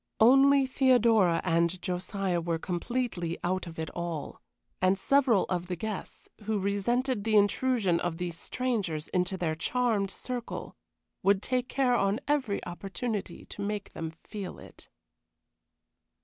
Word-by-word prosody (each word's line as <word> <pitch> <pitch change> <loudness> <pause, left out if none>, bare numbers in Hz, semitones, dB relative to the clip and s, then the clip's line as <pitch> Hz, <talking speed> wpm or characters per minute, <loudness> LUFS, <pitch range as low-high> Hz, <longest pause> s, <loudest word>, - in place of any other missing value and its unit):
Only 270 +4 +6
Theodora 235 -9 +4
and 170 +1 +1
Josiah 180 0 -2
were 165 0 -1
completely 180 -1 -2
out 185 +1 -1
of 165 - -9
it 160 0 -4
all, 170 -3 -5 0.4
and 185 +1 +4
several 255 -2 +3
of 180 -1 -2
the 180 - -2
guests, 210 +3 -6 0.2
who 220 0 0
resented 205 +4 0
the 220 0 +1
intrusion 205 -3 +3
of 175 -2 -2
these 175 -1 -4
strangers 200 -9 -2
into 180 +1 0
their 170 -3 0
charmed 215 +3 0
circle, 245 +4 -5 0.5
would 200 0 +3
take 255 0 -1
care 260 -2 +2
on 200 -1 +2
every 265 -8 0
opportunity 195 +2 -4
to - - -8
make 205 0 -3
them 160 - -4
feel 205 -3 -6
it. - - -14
200 Hz, 135 wpm, -29 LUFS, 175-245 Hz, 0.5 s, Only